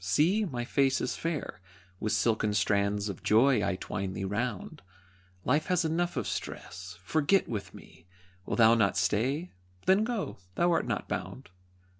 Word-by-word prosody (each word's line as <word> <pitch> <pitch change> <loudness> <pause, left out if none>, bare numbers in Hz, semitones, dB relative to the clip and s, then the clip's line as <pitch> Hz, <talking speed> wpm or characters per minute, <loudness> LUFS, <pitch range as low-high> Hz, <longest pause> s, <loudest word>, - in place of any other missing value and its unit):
See, 185 - +2
my 120 -8 -4
face 135 +1 +2
is 125 - -2
fair 160 - -4 0.4
With 110 - -1
silken 105 0 +1
strands 100 +1 +1
of 100 -4 -6
joy 125 +5 +4
I 95 - 0
twine 95 0 -4
thee 95 - -4
round; 105 +1 -3 0.6
Life 150 +4 +2
has 180 -2 +2
enough 175 +2 -1
of - - -1
stress 90 -1 -6
forget 155 - +2
with 105 -4 -5
me! 85 - -15 0.4
Wilt 100 - -2
thou 115 -1 +7
not 100 -4 +2
stay? 130 - 0 0.3
Then 190 +4 +4
go, 230 -3 -3 0.2
thou 175 0 +3
art 165 - +1
not - - -2
bound. 130 -7 -5
120 Hz, 160 wpm, -29 LUFS, 100-160 Hz, 0.6 s, thou